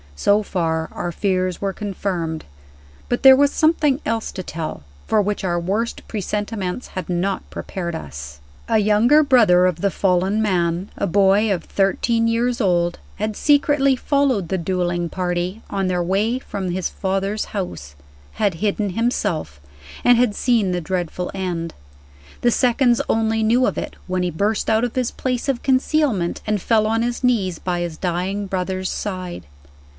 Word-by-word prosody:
So 200 - +3
far, 160 -4 -1
our 175 - -3
fears 185 0 -1
were 195 -1 -1
confirmed. 185 -6 -3 0.6
But 245 - -1
there 265 -1 +10
was 285 +1 +3
something 310 -4 +2
else 225 -1 -1
to 185 - -5
tell, 160 - -5 0.2
for 220 - +3
which 205 0 -1
our 175 -2 0
worst 205 +7 -2
presentiments 205 0 -3
had 185 -2 -6
not 185 +2 -1
prepared 170 -3 -5
us. 70 - -8 0.3
A 225 - +3
younger 220 +8 +4
brother 220 -10 +5
of 180 -3 +1
the 200 - +2
fallen 190 +2 +1
man 180 -2 0
(a - - 0
boy 200 +3 +3
of 180 - -3
thirteen 230 +4 +1
years 235 +2 0
old) 175 -3 +1 0.2
had 215 0 -3
secretly 285 -1 +3
followed 260 - +1
the 190 - 0
dueling 175 -1 -1
party, 180 +3 -2
on 195 -2 -1
their 180 -1 0
way 205 +7 +1
from 200 -7 -5
his 180 0 -2
father's 195 +2 -2
house 80 - -6 0.4
had 205 -5 0
hidden 205 +2 -1
himself 180 - -1 0.4
and 245 -1 +6
had 240 -4 +2
seen 225 -6 +2
the 180 0 -1
dreadful 180 0 -3
end. 175 -4 -3 0.7
The 240 - +3
seconds 245 0 +3
only 225 0 +1
knew 235 +4 +3
of - - -2
it - - -4
when 185 0 -1
he 180 - -1
burst 205 +7 0
out 220 +1 +3
of 245 - -2
his 255 -2 0
place 250 -1 -2
of 255 -3 -1
concealment, 260 - +1
and 210 -2 0
fell 220 +1 +2
on 225 +1 +1
his 240 +2 -2
knees 200 -9 +1
by 175 0 -2
his 170 -2 -4
dying 185 +3 -2
brother's 185 0 -2
side. 185 - -5
195 Hz, 165 wpm, -21 LUFS, 180-230 Hz, 0.7 s, there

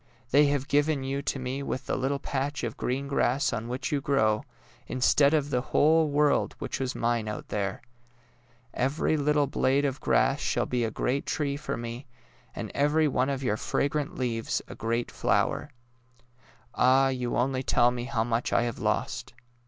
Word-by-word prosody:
They 145 +2 +6
have 140 -1 0
given 145 -1 +2
you 135 +1 -2
to 140 - -2
me 130 +1 -3
with 130 -1 -4
the - - -1
little 135 +2 0
patch 140 +1 -3
of 115 -2 -3
green 135 +3 -2
grass 140 0 +1
on 110 +2 -3
which 125 +6 -3
you 145 -2 0
grow, 110 -6 +2 0.4
instead 140 +3 +3
of 145 -2 0
the 125 - +1
whole 155 +4 +3
world 145 0 +2
which - - -4
was 130 -1 -2
mine 115 -2 0
out 105 - -6
there! 100 0 -3 0.9
Every 135 +5 0
little 150 0 +2
blade 140 +1 +1
of 135 0 -2
grass - - +2
shall - - 0
be 125 -1 -1
a 115 - 0
great 130 +5 -2
tree 145 -3 -1
for 145 - -4
me, 120 +3 -6 0.5
and - - -5
every 150 +2 +3
one 130 -1 +1
of 135 -1 -2
your 110 -4 0
fra 140 - 0
grant 145 0 -3
leaves 115 -3 -1
a - - -8
great 115 +1 -2
flower. - - 0 1.0
Ah, 135 +1 +4
you 125 -2 -2
only 130 +1 +1
tell 120 -1 +3
me 120 -1 -4
how 110 -2 0
much 115 +1 -1
I - - +3
have 120 -1 -3
lost! - - -2
135 Hz, 185 wpm, -28 LUFS, 120-145 Hz, 1.0 s, They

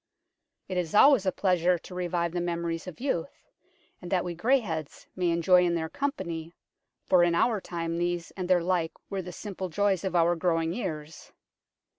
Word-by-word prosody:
It 185 - -3
is 175 0 -2
always 265 -4 +6
a - - +4
pleasure 180 -2 +2
to 175 - -12
revive 175 -1 -1
the 175 0 -2
memories 170 -1 -3
of 180 - -8
youth, 245 -11 -3 0.6
and 175 - -8
that 180 -2 +1
we 175 -1 -4
greyheads 175 - -1
may 180 -2 +1
enjoy 175 +2 +4
in 175 -1 +1
their 160 -1 -2
company, 170 - -4 0.5
for 180 -2 +5
in 170 -1 +2
our 215 +3 +2
time 170 -1 -3
these 175 -1 -2
and 185 -2 -5
their 180 -2 +4
like 175 -2 0 0.2
were 195 -1 -2
the 180 0 -8
simple 190 0 -6
joys 195 +1 +1
of 190 -2 -2
our 170 0 +4
growing 165 -1 0
years. 155 -7 -6
175 Hz, 180 wpm, -28 LUFS, 170-185 Hz, 0.6 s, always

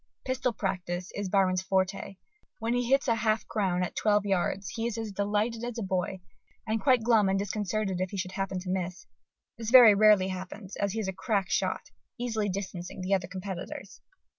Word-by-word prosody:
Pistol 260 -1 0
practice 180 -4 -3
is 200 -2 -3
Byron's 185 -2 +2
forte; 190 +1 -1 0.4
when 230 +1 -1
he 245 -1 0
hits 275 +1 +3
a 235 - +4
half 220 -1 0
crown 185 -4 0
at 180 - -4
twelve 210 -1 +2
yards 195 0 0
he 230 0 -2
is 235 - -4
as 225 -2 -4
delighted 210 +3 -1
as 240 -1 -4
a 230 - -2
boy, 185 0 -2 0.4
and 220 0 -1
quite 255 -5 +4
glum 220 -4 +4
and 195 - +2
disconcerted 200 -1 -2
if 185 - -1
he 200 - -6
should 185 0 -3
happen 195 0 -3
to 180 - -7
miss. 185 -1 -3 0.5
This 225 -1 -3
very 240 -4 +9
rarely 205 -2 +5
happens, 185 +2 -7
as 200 -1 -1
he 225 - -2
is 210 - -2
a 190 - -2
crack 200 -1 -1
shot, - - -1 0.3
easily 225 -4 -1
distancing 190 -1 -5
the 185 +2 0
other 185 -3 +1
competitors. 190 0 -7
200 Hz, 195 wpm, -29 LUFS, 185-220 Hz, 0.5 s, very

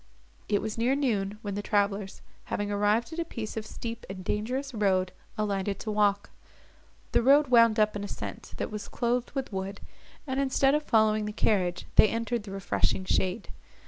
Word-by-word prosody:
It 205 - +1
was 220 +1 -4
near 250 +4 +3
noon, 210 -8 0
when 205 -1 -3
the 205 - -2
travellers, 200 -2 -1 0.2
having 205 0 -2
arrived 210 +7 +1
at 330 - -5
a - - +1
piece 230 -9 -6
of 220 -1 -4
steep 230 0 -6
and 190 -1 -6
dangerous 255 +7 -2
road, 190 -4 +1 0.3
alighted 200 -2 -1
to 215 - -3
walk. 205 -1 +1 0.8
The - - +3
road 280 +3 +5
wound 230 -3 +6
up 215 0 +3
an 205 - -3
ascent, 205 - -7
that - - -3
was 210 -1 -5
clothed 240 +1 -1
with 265 -6 -4
wood, 195 +1 -4 0.5
and, 265 -1 -2
instead 275 0 +3
of 300 - +2
following 215 -5 +3
the 210 - -3
carriage, 185 -5 0
they - - +9
entered 230 +1 -1
the 205 -1 -9
refreshing 195 -1 0
shade. 190 +3 0
215 Hz, 180 wpm, -28 LUFS, 200-235 Hz, 0.8 s, they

